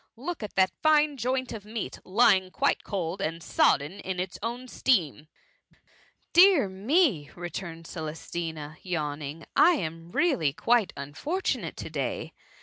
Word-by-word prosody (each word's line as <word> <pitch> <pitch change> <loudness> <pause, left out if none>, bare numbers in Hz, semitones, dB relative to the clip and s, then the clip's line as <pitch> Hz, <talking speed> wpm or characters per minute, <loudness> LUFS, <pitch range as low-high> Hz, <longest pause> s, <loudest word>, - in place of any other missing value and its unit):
look 325 +6 -5
at 210 - -6
that 190 -1 +4
fine 305 -1 +4
joint 255 +1 -1
of 215 -3 -7
meat, 215 +1 -5
lying 190 -2 +4
quite - - 0
cold 185 -1 -3
and 165 -1 -3
sodden 150 +6 +2
in 185 -2 -4
its 180 0 -4
own 240 +3 -4
steam.*" 165 - +1 1.1
Dear 350 - +7
me 200 - +2
!^ - - -19
returned 170 -1 -6
Celestina, 160 -1 -6
yawning, 155 -3 -4
I 355 - +7
am 165 - -4
really 180 - +2
quite 230 +5 +2
unfortunate 220 - -3
to - - -6
day - - -3
190 Hz, 140 wpm, -27 LUFS, 160-250 Hz, 1.1 s, Dear